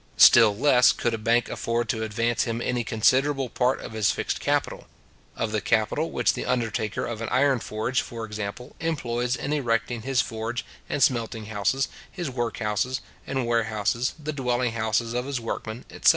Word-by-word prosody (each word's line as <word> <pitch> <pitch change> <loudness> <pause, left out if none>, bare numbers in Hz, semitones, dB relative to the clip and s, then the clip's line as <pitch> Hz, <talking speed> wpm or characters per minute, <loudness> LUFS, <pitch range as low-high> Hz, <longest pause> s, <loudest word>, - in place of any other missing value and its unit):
Still 110 -4 +8
less 125 -1 +5
could 120 - -1
a - - 0
bank 115 +2 +2
afford 115 +1 -1
to 110 - -1
advance 115 +2 0
him 115 -1 -2
any 120 0 -1
considerable 130 +5 +2
part 125 +1 +1
of - - -7
his 110 -2 +2
fixed - - -1
capital; - - -1 0.5
of 115 - -2
the 105 -1 0
capital 110 - +1
which - - +1
the - - -4
undertaker 115 -4 -1
of 115 -2 -5
an 115 - -3
iron 135 0 +3
forge, 110 +4 -1
for 115 -1 -6
example, 105 +4 -6
employs 125 -6 -1
in 145 - -3
erecting 120 -4 0
his 130 +1 0
forge 115 +2 -2 0.2
and 140 - +1
smelting 115 -3 +1
houses, 110 +6 +1 0.2
his 175 -7 -4
work 120 -2 -2
houses, 110 +4 -1 0.3
and 135 -2 -1
warehouses, 115 +1 0
the 155 0 -4
dwelling 125 -3 0
houses 115 +1 0
of 125 +1 -1
his 140 -3 -2
workmen, 115 0 -5
etc. - - +4
120 Hz, 180 wpm, -25 LUFS, 110-125 Hz, 0.5 s, Still